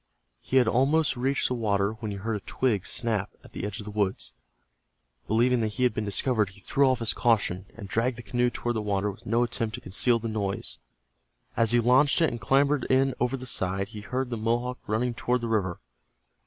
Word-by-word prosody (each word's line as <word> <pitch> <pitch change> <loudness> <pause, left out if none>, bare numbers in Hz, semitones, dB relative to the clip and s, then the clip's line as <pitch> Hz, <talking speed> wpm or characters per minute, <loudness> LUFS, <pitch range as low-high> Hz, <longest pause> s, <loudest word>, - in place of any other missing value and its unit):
He 130 - 0
had 125 -3 +5
almost 135 +6 +2
reached 135 +3 0
the - - -1
water 100 -4 +1
when 110 - -4
he 100 - -4
heard 110 +3 -2
a - - -2
twig 105 -2 -1
snap 110 -5 -1
at - - -15
the - - -5
edge 105 +2 -5
of 105 - -7
the 105 - -6
woods. 100 -2 -1 0.9
Believing 120 +3 +3
that 110 -2 -1
he 125 - -1
had 125 - +3
been 110 0 -2
discovered, 105 +1 +1
he 95 +1 -14
threw 135 +7 +2
off 130 - +2
his 115 -2 -1
caution, 100 -5 +1
and 105 -4 -8
dragged 115 +5 0
the 120 - -8
canoe 125 +1 +1
toward 120 -1 -2
the - - -1
water 105 -1 0
with 95 - -15
no 115 +3 +2
attempt 115 -2 -2
to - - -9
conceal 115 +6 +1
the 115 0 -4
noise. 105 -3 -2 0.8
As 115 -1 +3
he 120 - +5
launched 130 +6 +4
it 165 - +3
and 120 -1 -6
clambered 140 +5 +2
in 135 0 +3
over 125 +2 0
the 130 - -8
side, 95 -4 -1
he 110 -2 -8
heard 125 +4 -3
the 120 - -2
Mohawk 120 +3 -1
running 120 +3 0
toward 125 +1 0
the 120 - -2
river. 100 -4 -1
115 Hz, 220 wpm, -27 LUFS, 105-125 Hz, 0.9 s, had